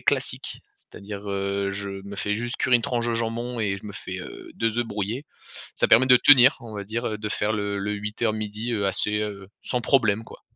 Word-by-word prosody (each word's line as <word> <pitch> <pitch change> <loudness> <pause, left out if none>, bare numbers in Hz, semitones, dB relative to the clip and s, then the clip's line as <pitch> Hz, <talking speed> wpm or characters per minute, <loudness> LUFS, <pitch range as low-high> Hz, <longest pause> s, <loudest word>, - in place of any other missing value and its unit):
classique. - - -1 0.2
C'est-à-dire, 100 0 -9
heu, 100 0 -1
je 100 0 -5
me 100 0 -8
fais 105 +1 -1
juste 120 +2 -4
cuire 125 - 0
une 120 - +5
tranche 120 -1 -1
de 115 - 0
jambon 115 +1 -3
et 100 -3 -1
je - - -17
me 100 - -7
fais, 95 -1 -5
heu, - - -10
2 115 +1 -1
œufs 120 - +1
brouillés. 105 +6 -3 0.5
Ça - - +2
permet 125 +3 +7
de 125 -1 +8
tenir 130 0 +8
on 115 -2 -10
va 100 -1 -5
dire, 115 +4 -3
heu, 105 - -3
de 105 0 -3
faire 105 +1 -1
le 100 -1 -2
le 100 +1 -2
8:00-12:00 105 +1 -2
heu, 100 -3 0
assez, 105 +2 0 0.4
sans 125 - -1
problème 110 -4 +2
quoi. - - -13
105 Hz, 215 wpm, -24 LUFS, 100-120 Hz, 0.5 s, de